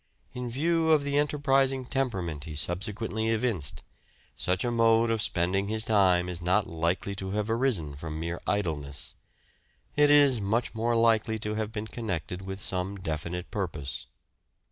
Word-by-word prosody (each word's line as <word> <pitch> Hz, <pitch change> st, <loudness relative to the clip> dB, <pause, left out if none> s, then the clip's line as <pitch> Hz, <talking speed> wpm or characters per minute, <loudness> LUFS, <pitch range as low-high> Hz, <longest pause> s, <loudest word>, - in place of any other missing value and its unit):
In 125 Hz, -1 st, -4 dB
view 160 Hz, +5 st, +2 dB
of 150 Hz, -2 st, +3 dB
the 145 Hz, 0 st, +1 dB
enterprising 135 Hz, -3 st, +2 dB
temperament 95 Hz, -, -2 dB
he 80 Hz, -2 st, -7 dB
subsequently 105 Hz, +7 st, -1 dB
evinced, 110 Hz, -, -1 dB, 0.5 s
such 90 Hz, +5 st, 0 dB
a 120 Hz, -, 0 dB
mode 115 Hz, 0 st, +4 dB
of 110 Hz, -1 st, 0 dB
spending 95 Hz, +2 st, 0 dB
his 110 Hz, +1 st, -1 dB
time 95 Hz, -4 st, +4 dB
is 90 Hz, -1 st, -5 dB
not 95 Hz, +4 st, +2 dB
likely 85 Hz, +4 st, -1 dB
to 95 Hz, -1 st, -4 dB
have 105 Hz, +1 st, -1 dB
arisen 115 Hz, -, 0 dB
from 80 Hz, +1 st, -6 dB
mere 85 Hz, +1 st, -4 dB
idleness; 75 Hz, -8 st, -1 dB, 0.8 s
it 145 Hz, 0 st, +5 dB
is 140 Hz, -5 st, +5 dB
much 110 Hz, +4 st, 0 dB
more 115 Hz, +1 st, 0 dB
likely 110 Hz, -1 st, +3 dB
to 105 Hz, 0 st, -3 dB
have 110 Hz, 0 st, -2 dB
been 110 Hz, -1 st, -4 dB
connected 95 Hz, -5 st, -4 dB
with 95 Hz, 0 st, -5 dB
some 95 Hz, 0 st, -2 dB
definite 85 Hz, 0 st, -4 dB
purpose. 80 Hz, -, -4 dB
105 Hz, 155 wpm, -28 LUFS, 90-115 Hz, 0.8 s, it